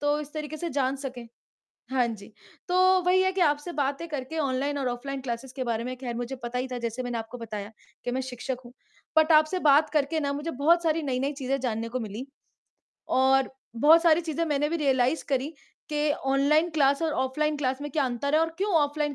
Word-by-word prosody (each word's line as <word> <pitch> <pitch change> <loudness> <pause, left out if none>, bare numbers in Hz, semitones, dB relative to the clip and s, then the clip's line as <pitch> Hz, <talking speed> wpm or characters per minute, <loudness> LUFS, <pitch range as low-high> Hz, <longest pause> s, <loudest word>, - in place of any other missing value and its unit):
तो 290 +1 +1
इस 295 0 -9
तरीके 305 0 -5
से 340 +1 -3
जान 270 0 0
सकें, 255 -3 -7 0.7
हाँ 255 -2 +2
जी। 215 -3 -7 0.4
तो 360 - 0 0.3
वही 365 +1 +4
है 375 - +2
कि 380 - -1
आपसे 295 +2 +1
बातें 285 +3 -1
करके 295 +2 -5
ऑनलाइन 280 +1 0
और 265 -2 -1
ऑफलाइन 265 +3 -4
क्लासेस 245 0 -5
के 260 - -3
बारे 230 -2 -1
में 255 +1 -4
खैर 245 -2 -5
मुझे 245 +2 -4
पता 245 +1 -2
ही 260 - -2
था 250 - -2
जैसे 235 +2 -3
मैंने 245 -1 -3
आपको 225 +2 -6
बताया, 215 -2 -6 0.3
कि 245 - -1
मैं 260 +1 -1
शिक्षक 255 0 -4
हूँ, 240 - -13 0.4
बट 315 +1 +5
आपसे 310 +4 +4
बात 295 +2 +5
करके 300 +1 +1
ना 280 -2 -1
मुझे 295 +4 -3
बहुत 330 +6 +3
सारी 325 0 +1
नई-नई 270 +1 -1
चीज़ें 270 0 -2
जानने 230 -2 -2
को 255 +1 -3
मिली। 220 +3 -5 0.9
और 265 0 +4 0.3
बहुत 315 +7 +6
सारी 335 0 +5
चीज़ें 330 0 -2
मैंने 295 -2 0
भी 335 - -1
रियलाइज 270 -1 +2
करी, 275 +4 0 0.3
कि 300 0 0 0.2
ऑनलाइन 300 +5 +3
क्लास 285 0 +2
और 320 -2 +1
ऑफलाइन 300 +3 -1
क्लास 265 -1 -1
में 290 - -5
क्या 290 0 +1
अंतर 260 +4 -1
है 315 - +5
और 325 - +2
क्यों 405 +1 0
ऑफलाइन 295 0 0
275 Hz, 215 wpm, -27 LUFS, 255-305 Hz, 0.9 s, बहुत